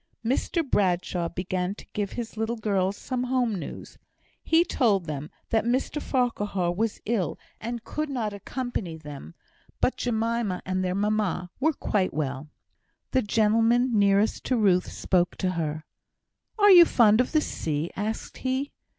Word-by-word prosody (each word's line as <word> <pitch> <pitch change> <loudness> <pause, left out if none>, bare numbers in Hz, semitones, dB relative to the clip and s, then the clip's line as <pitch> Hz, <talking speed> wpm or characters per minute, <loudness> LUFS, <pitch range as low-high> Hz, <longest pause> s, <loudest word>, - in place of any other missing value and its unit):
Mr 280 +6 0
Bradshaw 180 -5 +1
began 180 +2 -2
to - - -12
give 205 -2 -2
his 235 -2 -5
little 225 +2 -1
girls 200 -3 0
some 250 -1 -3
home 250 -3 +1
news. 185 - -7 0.4
He 330 +1 +4
told 215 - +1
them 150 -1 -5 0.2
that 225 - +3
Mr 260 +5 0
Farquhar 205 -8 0
was 215 +5 -1
ill, 205 -8 -1 0.2
and 235 0 -5
could 305 +3 -3
not 230 -6 -2
accompany 205 -5 -4
them; 150 +1 -10 0.4
but 255 - +1
Jemima 230 -4 -1
and 185 0 -1
their 180 0 -1
mamma 200 -3 0
were 315 +4 +2
quite 195 - -1
well. 140 -1 -3 0.6
The 260 - +3
gentleman 225 +3 +3
nearest 200 0 +3
to 255 - +1
Ruth 190 -5 +3
spoke 180 -2 +1
to 185 -2 -1
her. 155 -3 -3 0.7
"Are 410 -1 +7
you 350 -2 +10
fond 225 -5 +5
of 250 - -2
the 310 - +4
sea?" 155 - -3
asked 215 +3 -4
he. 260 +2 -2
210 Hz, 150 wpm, -26 LUFS, 180-245 Hz, 0.7 s, you